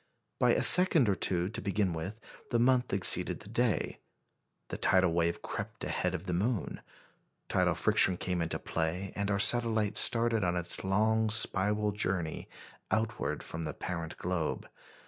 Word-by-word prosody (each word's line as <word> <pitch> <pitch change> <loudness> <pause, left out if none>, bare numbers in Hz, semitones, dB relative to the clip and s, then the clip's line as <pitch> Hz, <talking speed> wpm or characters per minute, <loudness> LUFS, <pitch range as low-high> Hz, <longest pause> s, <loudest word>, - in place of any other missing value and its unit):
By - - +3
a - - 0
second 180 -8 +7
or - - +2
two 90 0 -1
to 110 - -7
begin 100 -2 -1
with, 95 +7 -6 0.3
the 120 - 0
month 125 +1 +1
exceeded 95 -1 +4
the - - -13
day; - - -2 0.7
the - - -5
tidal 90 -3 +2
wave 85 0 -1
crept - - -7
ahead - - -2
of 85 - -7
the 90 - -4
moon; 105 +3 -3 0.7
tidal - - +1
friction 90 - +3
came 90 -1 -3
into 85 0 -2
play, 85 +4 -4
and 100 0 -3
our 100 - 0
satellite 110 -1 +2
started 115 -2 +2
on 90 0 -1
its 85 -1 +1
long 110 +3 +1
spiral 105 -1 0
journey 90 -5 -4 0.4
outward 110 0 -2
from 80 - -7
the 75 -1 -5
parent 85 -3 -6
globe. 85 -3 -4
100 Hz, 160 wpm, -30 LUFS, 90-110 Hz, 0.7 s, second